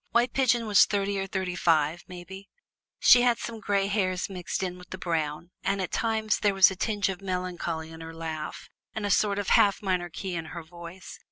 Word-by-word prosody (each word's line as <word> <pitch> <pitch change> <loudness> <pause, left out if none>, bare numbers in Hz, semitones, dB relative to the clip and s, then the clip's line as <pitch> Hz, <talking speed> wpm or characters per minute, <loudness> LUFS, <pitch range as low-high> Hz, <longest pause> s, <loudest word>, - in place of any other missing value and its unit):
White 240 +1 +2
Pigeon 245 -3 +2
was 210 -2 +6
thirty 200 -1 -1
or 195 - -3
thirty 190 -3 -3
five, 165 -1 +2
mebbe; 190 +2 -9 0.5
she 245 - +7
had 240 -1 +3
some 230 -1 -6
gray 200 -1 +1
hairs 195 -2 -1
mixed 180 0 -3
in 180 -1 -4
with 180 - -14
the 185 - -6
brown, 165 -1 -3
and 195 - 0
at 185 - -3
times 220 -1 0
there 205 -2 +2
was 190 0 +7
a - - -5
tinge 205 +1 0
of 190 -1 -4
melancholy 180 -4 -3
in 160 0 -10
her 165 0 -7
laugh 160 -1 -6 0.3
and 220 -2 -3
a 205 - 0
sort 200 -1 +2
of 205 -2 -2
half 200 0 +4
minor 180 -3 0
key 185 +4 -5
in 165 -2 -3
her 170 +1 -7
voice. 170 +2 -11
190 Hz, 210 wpm, -27 LUFS, 175-205 Hz, 0.5 s, she